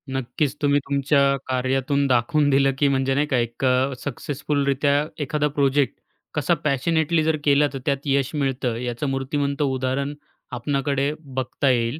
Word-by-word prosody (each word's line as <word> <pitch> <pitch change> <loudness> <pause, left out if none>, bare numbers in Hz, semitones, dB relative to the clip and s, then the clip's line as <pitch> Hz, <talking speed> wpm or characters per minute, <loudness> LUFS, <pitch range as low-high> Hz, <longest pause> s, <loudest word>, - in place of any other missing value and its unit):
नक्कीच, 135 +3 -1
तुम्ही 145 -1 +3
तुमच्या 140 0 +2
कार्यातून 130 +2 0
दाखवून 145 +4 +2
दिलं, 135 0 +4
की 145 - +3
म्हणजे 135 -1 +1
नाही 145 +2 +1
का 135 - +1
एक 120 +1 -3
अ, 130 +1 +2
सक्सेसफुलरीत्या 140 +1 0 0.2
एखादा 150 0 0
प्रोजेक्ट 140 -1 +1 0.4
कसा 150 +3 +1
पॅशनेटली 160 +3 +1
जर 160 0 +1
केला, 145 0 +4
तर 135 - -4
त्यात 140 -2 +1
यश 140 -1 +1
मिळतं. 135 -4 -1
याचं 120 +3 -3
मूर्तिमंत 140 +2 -2
उदाहरण 135 +1 -1 0.4
आपणाकडे 140 +3 -1 0.3
बघता 130 +2 0
येईल. 120 +3 +1
140 Hz, 145 wpm, -23 LUFS, 130-145 Hz, 0.4 s, दिलं